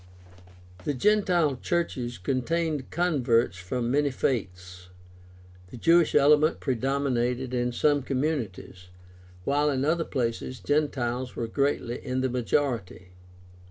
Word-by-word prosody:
The 145 Hz, -, -1 dB
gentile 175 Hz, -4 st, +2 dB
churches 125 Hz, -6 st, -2 dB
contained 140 Hz, -, -1 dB
converts 130 Hz, -, +1 dB
from 120 Hz, +7 st, -2 dB
many 145 Hz, +1 st, +2 dB
faiths. 90 Hz, -8 st, -3 dB, 0.8 s
The 125 Hz, -, -10 dB
Jewish 165 Hz, +6 st, +4 dB
element 150 Hz, +2 st, +4 dB
predominated 130 Hz, -1 st, -1 dB
in 125 Hz, 0 st, 0 dB
some 145 Hz, +3 st, +2 dB
communities, 130 Hz, -, -3 dB, 0.6 s
while 145 Hz, +4 st, +2 dB
in 135 Hz, -1 st, 0 dB
other 165 Hz, +2 st, +1 dB
places 125 Hz, -1 st, -3 dB
Gentiles 130 Hz, -4 st, -1 dB
were 115 Hz, -, -2 dB
greatly 125 Hz, 0 st, -1 dB
in 130 Hz, -1 st, -2 dB
the 130 Hz, -, 0 dB
majority. 120 Hz, -7 st, -1 dB
130 Hz, 110 wpm, -27 LUFS, 120-150 Hz, 0.8 s, Jewish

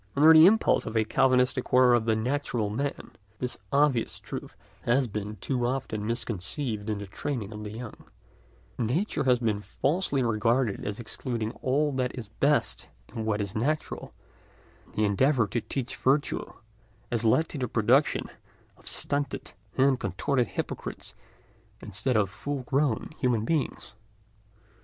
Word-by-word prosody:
Under 155 Hz, +3 st, +8 dB
the 160 Hz, +2 st, +9 dB
impulse 220 Hz, +3 st, +3 dB
of 110 Hz, -, -2 dB
a 110 Hz, -, +4 dB
Calvinistic 130 Hz, +1 st, +2 dB
horror 125 Hz, -1 st, +5 dB
of 120 Hz, -2 st, +3 dB
the 110 Hz, -1 st, +2 dB
"natural 120 Hz, -2 st, -1 dB
man," 140 Hz, +6 st, -3 dB, 0.3 s
this 125 Hz, +1 st, -3 dB
obvious 140 Hz, -4 st, +2 dB
truth -, -, -7 dB, 0.3 s
has 125 Hz, +2 st, +2 dB
been 105 Hz, 0 st, -4 dB
too 120 Hz, +5 st, -2 dB
often 115 Hz, -5 st, -2 dB
misconceived 115 Hz, 0 st, -3 dB
in 105 Hz, -, -1 dB
the 100 Hz, -, -6 dB
training 110 Hz, +1 st, -4 dB
of 105 Hz, 0 st, -7 dB
the 105 Hz, -, -5 dB
young; 115 Hz, +2 st, -8 dB, 0.7 s
"nature" 135 Hz, -, 0 dB
has 125 Hz, -1 st, +5 dB
been 110 Hz, -4 st, -1 dB
falsely 140 Hz, -, 0 dB
regarded 115 Hz, 0 st, +1 dB
as 105 Hz, +2 st, -4 dB
excluding 115 Hz, -1 st, -3 dB
all 145 Hz, +3 st, +2 dB
that 130 Hz, -1 st, -2 dB
is 110 Hz, -5 st, -6 dB
best 140 Hz, +7 st, +1 dB, 0.3 s
in 110 Hz, -, -3 dB
what 105 Hz, -1 st, 0 dB
is 100 Hz, -1 st, -4 dB
natural, 145 Hz, +8 st, -2 dB, 0.7 s
and -, -, -22 dB
the 105 Hz, -, +2 dB
endeavour 120 Hz, +4 st, +3 dB
to 115 Hz, +3 st, -2 dB
teach 120 Hz, +4 st, -4 dB
virtue 140 Hz, +3 st, +1 dB, 0.6 s
has 120 Hz, -1 st, 0 dB
led 115 Hz, +8 st, +3 dB
to 145 Hz, -, -6 dB
the 125 Hz, -, -1 dB
production 120 Hz, +6 st, +2 dB, 0.5 s
of -, -, -19 dB
stunted 145 Hz, 0 st, -2 dB, 0.3 s
and 135 Hz, -1 st, +4 dB
contorted 130 Hz, -5 st, 0 dB
hypocrites -, -, -5 dB, 0.7 s
instead 110 Hz, +5 st, -1 dB
of 105 Hz, -2 st, +3 dB
full 140 Hz, +5 st, -4 dB
grown 135 Hz, -1 st, 0 dB
human 120 Hz, -5 st, +1 dB
beings. 155 Hz, -6 st, -2 dB
125 Hz, 150 wpm, -28 LUFS, 110-140 Hz, 0.7 s, the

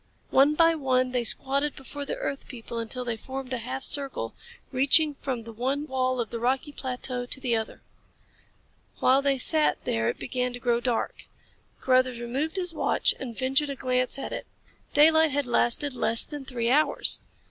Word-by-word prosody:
One 285 Hz, +3 st, +5 dB
by 330 Hz, +1 st, +5 dB
one 255 Hz, -4 st, +1 dB
they 250 Hz, -1 st, 0 dB
squatted 275 Hz, +5 st, +1 dB
before 285 Hz, +2 st, -7 dB
the -, -, -3 dB
earth 275 Hz, -, -5 dB
people 235 Hz, -2 st, -7 dB
until 245 Hz, +2 st, -4 dB
they 235 Hz, -1 st, -2 dB
formed 260 Hz, +3 st, -6 dB
a 250 Hz, -, -1 dB
half 260 Hz, +3 st, -4 dB
circle, 270 Hz, -, -1 dB, 0.4 s
reaching 290 Hz, +3 st, +3 dB
from 260 Hz, -4 st, -4 dB
the 230 Hz, 0 st, -10 dB
one 265 Hz, +6 st, -2 dB
wall 255 Hz, -2 st, -1 dB
of 230 Hz, -3 st, -3 dB
the 235 Hz, -, -4 dB
rocky 260 Hz, +5 st, 0 dB
plateau 250 Hz, -2 st, -4 dB
to 265 Hz, -, -4 dB
the 250 Hz, -3 st, 0 dB
other. 220 Hz, -1 st, -4 dB, 1.1 s
While 265 Hz, +2 st, +4 dB
they 275 Hz, -1 st, +1 dB
sat 305 Hz, +4 st, +3 dB
there 115 Hz, 0 st, 0 dB
it -, -, -3 dB
began 250 Hz, -1 st, -2 dB
to 245 Hz, -, -6 dB
grow 240 Hz, -1 st, +1 dB
dark. 240 Hz, -1 st, -2 dB, 0.6 s
Carruthers 255 Hz, -2 st, +2 dB
removed 265 Hz, +8 st, -3 dB
his 360 Hz, -3 st, -1 dB
watch -, -, +1 dB
and 240 Hz, -4 st, -6 dB
ventured 270 Hz, +3 st, +1 dB
a 280 Hz, -, -3 dB
glance 255 Hz, 0 st, 0 dB
at 275 Hz, -, -5 dB
it. -, -, -6 dB, 0.5 s
Daylight 315 Hz, +2 st, +6 dB
had 285 Hz, 0 st, 0 dB
lasted 245 Hz, +3 st, +1 dB
less 230 Hz, -2 st, +3 dB
then 290 Hz, -3 st, -8 dB
three 240 Hz, -2 st, -1 dB
hours. 300 Hz, +3 st, +4 dB
260 Hz, 180 wpm, -26 LUFS, 245-280 Hz, 1.1 s, Daylight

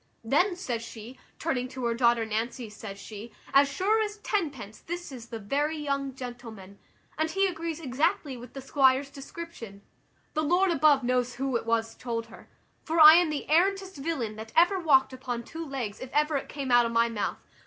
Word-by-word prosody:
`Then,' 350 Hz, -, +2 dB
says 245 Hz, -11 st, -3 dB
she, 230 Hz, +2 st, -10 dB, 0.2 s
turning 260 Hz, -6 st, -1 dB
to 255 Hz, -1 st, -6 dB
her 235 Hz, -, +1 dB
daughter 235 Hz, -1 st, +3 dB
Nancy, 225 Hz, +1 st, -3 dB
says 205 Hz, -1 st, -8 dB
she, 210 Hz, +3 st, -9 dB, 0.2 s
`as 280 Hz, +1 st, +6 dB
sure 395 Hz, +10 st, +1 dB
as 420 Hz, -1 st, -3 dB
tenpence 290 Hz, -, -3 dB
this 350 Hz, -1 st, -6 dB
is 240 Hz, -3 st, -9 dB
the 230 Hz, -, -6 dB
very 285 Hz, +9 st, -1 dB
young 275 Hz, -2 st, -2 dB
gentleman, 230 Hz, -6 st, -9 dB, 0.4 s
and 315 Hz, 0 st, +1 dB
he 390 Hz, +3 st, +2 dB
agrees 335 Hz, -3 st, -3 dB
exactly 290 Hz, +1 st, 0 dB
with 245 Hz, 0 st, -11 dB
the 270 Hz, -, -7 dB
squire's 270 Hz, 0 st, +3 dB
description.' 275 Hz, -8 st, -9 dB, 0.5 s
The 310 Hz, -, 0 dB
Lord 355 Hz, +5 st, +3 dB
above 290 Hz, -4 st, +4 dB
knows 250 Hz, 0 st, 0 dB
who 270 Hz, -1 st, -2 dB
it 230 Hz, -, -2 dB
was 225 Hz, 0 st, 0 dB
told 230 Hz, -2 st, -4 dB
her: -, -, -14 dB, 0.3 s
for 325 Hz, +1 st, -1 dB
I 310 Hz, 0 st, +11 dB
am 350 Hz, -2 st, +3 dB
the 300 Hz, -2 st, -3 dB
arrantest 380 Hz, +3 st, +2 dB
villain 270 Hz, -8 st, -3 dB
that 220 Hz, +1 st, -8 dB
ever 350 Hz, +4 st, +5 dB
walked 270 Hz, -6 st, +4 dB
upon 250 Hz, -2 st, -4 dB
two 325 Hz, +7 st, -7 dB
legs 255 Hz, -8 st, -5 dB
if 255 Hz, -, -8 dB
ever 300 Hz, +1 st, +2 dB
it 275 Hz, -, -3 dB
came 275 Hz, -3 st, -4 dB
out 240 Hz, -1 st, +6 dB
of -, -, -5 dB
my 230 Hz, 0 st, +3 dB
mouth. 225 Hz, -3 st, -3 dB
270 Hz, 195 wpm, -28 LUFS, 235-320 Hz, 0.5 s, I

